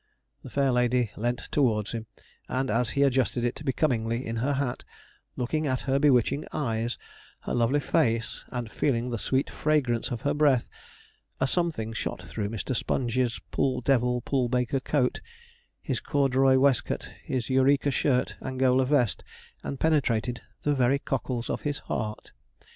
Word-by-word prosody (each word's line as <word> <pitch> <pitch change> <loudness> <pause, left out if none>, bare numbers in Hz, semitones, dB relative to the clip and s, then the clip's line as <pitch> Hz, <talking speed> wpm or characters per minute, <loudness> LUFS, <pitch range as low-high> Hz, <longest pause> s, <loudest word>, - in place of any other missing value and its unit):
The - - -10
fair 140 -1 +2
lady 125 -2 +2
leant 120 +2 -1
towards 110 -7 +1
him, 115 -2 -5 0.4
and 130 -2 -1
as 115 +1 +1
he 140 - +5
adjusted 130 -3 +2
it 120 +3 -2
becomingly 125 -4 0
in 115 +1 -3
her 135 +5 +1
hat, 135 -3 -2 0.5
looking 155 +5 -1
at 130 -2 0
her 135 0 +1
bewitching 140 0 +3
eyes, 115 -4 -1 0.4
her - - -4
lovely 120 +5 +2
face, 115 -8 0
and 120 -2 -5
feeling 125 -3 0
the 115 - -2
sweet 130 +6 +1
fragrance 135 -7 0
of 120 -2 -4
her 145 - +1
breath, 145 -5 +3 0.7
a 135 - +2
something 135 -8 -1
shot - - -4
through 100 -1 -4
Mr. 115 +4 -3
Sponge's 120 0 0
pull 130 -2 +1
devil, 125 -1 +2
pull 125 -1 0
baker 125 +2 +1
coat, 130 -2 0 0.6
his - - -1
corduroy 135 -2 +3
waistcoat, 135 -1 +1
his 130 -2 -2
Eureka 140 +2 +3
shirt, 130 -1 +1
Angola 130 0 +2
vest, 125 -6 +2 0.4
and 140 - -5
penetrated 125 -7 +1 0.2
the 145 - +2
very 130 0 +3
cockles 130 -4 -3
of - - -2
his 145 -1 -2
heart. 110 0 -4
130 Hz, 155 wpm, -27 LUFS, 120-140 Hz, 0.7 s, he